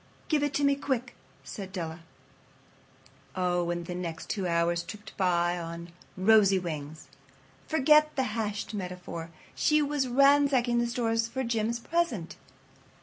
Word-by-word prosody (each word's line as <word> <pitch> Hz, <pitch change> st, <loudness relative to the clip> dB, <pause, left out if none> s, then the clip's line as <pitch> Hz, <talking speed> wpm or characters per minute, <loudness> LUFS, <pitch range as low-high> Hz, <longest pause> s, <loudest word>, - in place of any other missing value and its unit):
"Give 305 Hz, -2 st, +2 dB
it 290 Hz, -1 st, -1 dB
to 290 Hz, -, +1 dB
me 280 Hz, 0 st, +5 dB
quick," 265 Hz, -3 st, -2 dB, 0.3 s
said 195 Hz, -2 st, -7 dB
Della. 170 Hz, -3 st, -5 dB, 1.4 s
Oh, 175 Hz, -2 st, 0 dB
and 175 Hz, 0 st, -2 dB
the 180 Hz, -, -5 dB
next 170 Hz, -2 st, -5 dB
two 195 Hz, -3 st, -2 dB
hours 170 Hz, 0 st, +1 dB
tripped 210 Hz, +4 st, -10 dB
by 175 Hz, -2 st, +1 dB
on 170 Hz, 0 st, -7 dB, 0.3 s
rosy 200 Hz, 0 st, +5 dB
wings. 155 Hz, -3 st, -5 dB, 0.6 s
Forget 305 Hz, 0 st, +4 dB
the 265 Hz, -, +1 dB
hashed 215 Hz, -1 st, -3 dB
metaphor. 180 Hz, -4 st, -6 dB, 0.2 s
She 305 Hz, 0 st, +3 dB
was 285 Hz, -2 st, 0 dB
ransacking 270 Hz, -2 st, +4 dB
the 240 Hz, -, +1 dB
stores 230 Hz, -1 st, 0 dB
for 260 Hz, +3 st, -3 dB
Jim's 230 Hz, 0 st, -1 dB
present. 275 Hz, -, -1 dB
210 Hz, 140 wpm, -28 LUFS, 175-265 Hz, 1.4 s, me